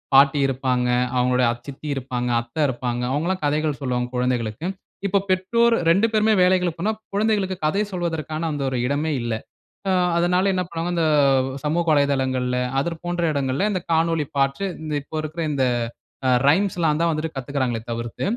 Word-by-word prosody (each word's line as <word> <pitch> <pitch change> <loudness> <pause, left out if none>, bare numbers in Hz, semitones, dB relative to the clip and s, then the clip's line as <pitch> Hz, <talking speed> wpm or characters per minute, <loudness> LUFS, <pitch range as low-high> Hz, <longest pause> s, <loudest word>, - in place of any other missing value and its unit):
பாட்டி 140 +1 +6
இருப்பாங்க. 125 -2 0 0.3
அவங்களுடைய 125 0 +3
அத்-சித்தி 135 +5 -9
இருப்பாங்க, 125 -2 -3
அத்த 120 +3 -15
இருப்பாங்க. 120 -1 -2
அவுங்களா 165 +6 0
கதைகள் 150 0 0
சொல்வாங்க 125 -2 -1
குழந்தைகளுக்கு. 125 +3 -1 0.4
இப்ப, 200 0 +2
பெற்றோர் 230 +6 +3 0.2
2 200 +6 +4
பேருமே 215 0 +3
வேலைகளுக்கு 180 -2 +2
போனா, 215 +3 +1 0.2
குழந்தைகளுக்கு 200 -3 +1
கதை 195 +7 +2
சொல்வதற்கான 160 -2 -2
அந்த 145 -2 -3
ஒரு 130 - -2
இடமே 150 +3 0
இல்ல. 120 -1 -2 0.6
ஆ, - - +3 0.3
அதனால 180 +3 +2
என்ன 185 - 0
பண்ணுவாங்க, 170 +1 -3
இந்த, 170 - +1 0.6
சமூக 165 +3 +1
வலைதளங்கள்ல, 130 -3 +1 0.2
அதர் 165 +2 -3
போன்ற 175 0 -1
இடங்கள்ல 140 +5 0
இந்த 185 -3 -1
காணொளி 165 -1 +2
பாற்று. 135 +7 +1 0.2
இந்த, 155 -1 -4
இப்ப 145 - -22
இருக்குற 155 +2 -5
இந்த 140 -2 0 0.9
ரைம்ஸ்ல்லாந்தான் 170 -2 +2
வந்துட்டு, 155 0 -3
கத்துக்கிறாங்களே 130 -3 -2
தவிர்த்து. 115 0 -4
150 Hz, 145 wpm, -23 LUFS, 130-175 Hz, 0.9 s, பாட்டி